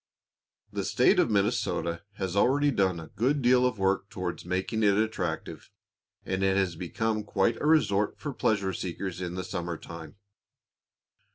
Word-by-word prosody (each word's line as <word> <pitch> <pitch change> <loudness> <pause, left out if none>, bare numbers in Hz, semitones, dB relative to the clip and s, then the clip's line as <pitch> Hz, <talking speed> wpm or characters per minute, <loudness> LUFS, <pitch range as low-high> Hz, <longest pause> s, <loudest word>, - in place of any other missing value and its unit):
The - - -2
State - - +3
of - - +3
Minnesota 100 -5 0
has 95 -2 -4
already 140 +7 +3
done 95 -7 +1
a 80 -2 -10
good 135 +5 +1
deal 125 +1 +5
of 125 -3 -3
work 95 0 0
towards 90 -2 -4
making 95 +5 -1
it 100 -2 +4
attractive, 95 -7 -2 0.6
and 95 0 -2
it 95 0 +2
has 95 -3 +1
become 105 +6 -2
quite 115 +2 +1
a 150 - 0
resort 105 -10 +3
for 145 -2 -5
pleasure 100 -6 0
seekers 90 +1 -4
in 90 -1 -4
the 95 - -3
summer 85 -2 -4
time. 80 -2 -10
95 Hz, 160 wpm, -28 LUFS, 90-110 Hz, 0.6 s, deal